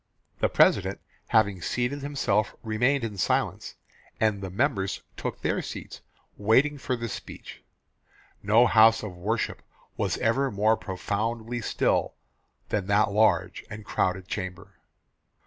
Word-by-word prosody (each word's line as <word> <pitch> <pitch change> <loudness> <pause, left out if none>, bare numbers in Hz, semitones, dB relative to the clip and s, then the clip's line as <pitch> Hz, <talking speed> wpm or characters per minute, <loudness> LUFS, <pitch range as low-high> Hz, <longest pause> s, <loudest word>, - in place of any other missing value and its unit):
"The - - +2
President - - +3 0.3
having 100 -4 +2
seated 125 - -2
himself 120 -7 0
remained 120 +5 +1
in 105 -4 -4
silence, - - -1 0.4
and 105 -3 +1
the 95 - -5
members 95 +1 -1
took - - -5
their - - 0
seats, - - -8 0.4
waiting 130 +8 +3
for 130 - -1
the 115 -1 -4
speech. 105 - -9 0.8
No 110 +4 +5
house 110 +1 +5
of 100 -4 -6
worship 110 +6 -2 0.4
was - - 0
ever 135 +5 +1
more 110 +1 +2
profoundly 110 +5 -3
still - - 0 0.5
than 100 -3 -1
that 105 +1 +3
large 95 -4 +2
and 105 0 -8
crowded 95 -1 -1
chamber. 95 -1 -6
110 Hz, 130 wpm, -27 LUFS, 100-115 Hz, 0.8 s, No